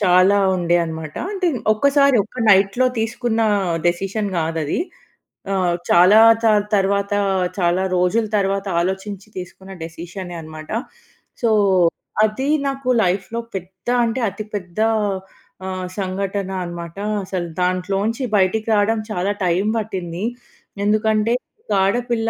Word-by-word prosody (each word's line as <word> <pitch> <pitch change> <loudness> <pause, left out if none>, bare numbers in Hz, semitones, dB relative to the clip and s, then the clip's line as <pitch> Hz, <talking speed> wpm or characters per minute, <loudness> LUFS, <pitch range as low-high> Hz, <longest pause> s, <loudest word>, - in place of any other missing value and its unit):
చాలా 185 +1 +5 0.2
ఉండే 175 -1 +2
అనమాట. 160 -1 -6 0.2
అంటే, 380 -3 -1 0.3
ఒక్కసారి 280 +3 +4
ఒక 250 +3 -9
నైట్‌లో 200 +5 +4
తీసుకున్న 225 +1 -1 0.5
డెసిషన్ 195 +4 -1
కాదది. 160 - -1 0.8
ఆహ్, 180 -2 +1
చాలా 185 +5 +7 0.2
చాల్ 210 -2 +4
తర్వాత, 200 +1 +1 0.5
చాలా 180 0 +1
రోజుల 180 +6 +2
తర్వాత 195 0 0 0.2
ఆలోచించి, 190 +2 -4
తీసుకున్న 190 +1 -8
డిసిషనే 175 +2 -7
అనమాట. 155 -1 -10 0.7
సో, 235 - +2 0.8
అది 260 +6 -2 0.2
నాకు 270 -1 -3
లైఫ్‌లో 195 +5 -1 0.2
పెద్ద 185 +2 -13 0.2
అంటే, 230 +3 -2
అతి 205 +2 -7
పెద్ద 180 -1 -6 0.9
ఆహ్, 185 -1 -4
సంఘటన 195 0 -2
అనమాట. 170 0 -7 0.3
అసలు 185 -2 -3
దాంట్లోంచి 195 +7 0
బయటికి 195 +4 +1
రావడం 215 +2 +2
చాలా 195 +1 0
టైమ్ 180 +4 +1
పట్టింది. 185 -3 -4 0.6
ఎందుకంటే, 215 +1 +2 0.4
ఒక 210 - +1
ఆడపిల్ల 235 +2 0
195 Hz, 115 wpm, -20 LUFS, 180-220 Hz, 0.9 s, చాలా